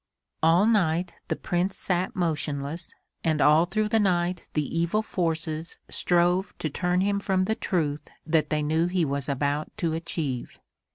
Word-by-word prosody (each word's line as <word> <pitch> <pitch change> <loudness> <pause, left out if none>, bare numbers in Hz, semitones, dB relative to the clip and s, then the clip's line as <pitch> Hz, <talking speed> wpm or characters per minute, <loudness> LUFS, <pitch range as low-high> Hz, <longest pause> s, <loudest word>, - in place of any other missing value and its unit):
All 165 +5 +5
night 180 -5 +2
the - - 0
Prince 180 +2 -1
sat 185 +5 -1
motionless 155 -2 -2 0.3
and 160 -2 +1
all 150 +3 +6
through 210 +4 0
the 225 - +3
night 180 -3 +1
the 150 0 -1
evil 170 +6 +1
forces 165 -4 -2
strove 180 +2 +1
to 155 - -3
turn 180 +3 +1
him 200 +1 +1
from 190 -2 +1
the 220 - +1
truth 150 -8 -1 0.2
that 155 -2 +2
they 150 -1 0
knew 160 +3 +2
he 180 -2 +1
was 140 0 -2
about 145 +2 0
to 170 -6 0
achieve. 160 -6 -3
170 Hz, 160 wpm, -26 LUFS, 155-185 Hz, 0.3 s, all